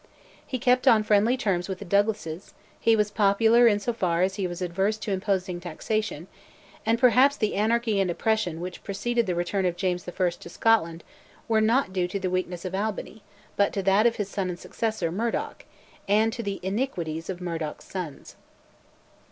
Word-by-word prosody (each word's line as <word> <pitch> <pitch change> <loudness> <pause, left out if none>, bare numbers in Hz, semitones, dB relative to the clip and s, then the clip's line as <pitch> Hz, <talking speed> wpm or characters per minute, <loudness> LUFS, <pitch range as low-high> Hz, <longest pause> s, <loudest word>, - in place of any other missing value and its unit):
He 260 - -2
kept 250 +1 +2
on 220 -2 +6
friendly 215 +4 +3
terms 195 -7 -1
with 190 - -3
the 200 - -9
Douglases, 200 -3 -1 0.2
he 230 - +4
was 210 -1 +1
popular 220 +4 +4
in 205 -2 +3
so 240 +3 -2
far 180 -5 +1
as 190 +1 +1
he 195 -1 -2
was 175 0 -6
averse 190 +4 0
to 215 -1 -5
imposing 190 -2 -1
taxation; 180 +1 -3 0.6
and 225 +1 +3
perhaps 255 +4 +5
the 215 -2 0
anarchy 220 0 +1
and 190 -2 +1
oppression 180 -3 -1
which 180 0 -7
preceded 235 +3 -1
the 180 - 0
return 175 +3 -1
of 175 -1 0
James 180 0 -2
I. 180 0 0
to 170 0 -11
Scotland 170 -5 +1 0.4
were 225 -1 +3
due 215 - +3
not 235 -4 +2
to 180 +1 -1
the 185 -1 -2
weakness 180 -1 -2
of 185 - -4
Albany 210 +2 -3 0.3
but 200 - +2
to 195 - -2
that 195 +4 +4
of 230 - 0
his 205 - -3
son 195 -2 -3
and 175 - -4
successor, 215 -4 -3
Murdoch, 225 +6 -3 0.4
and 215 +3 +3
to 240 - -4
the 200 -3 -4
iniquities 185 - -3
of 185 -2 -4
Murdoch's 165 -4 -5
sons. 175 -7 -7
200 Hz, 185 wpm, -26 LUFS, 180-220 Hz, 0.6 s, on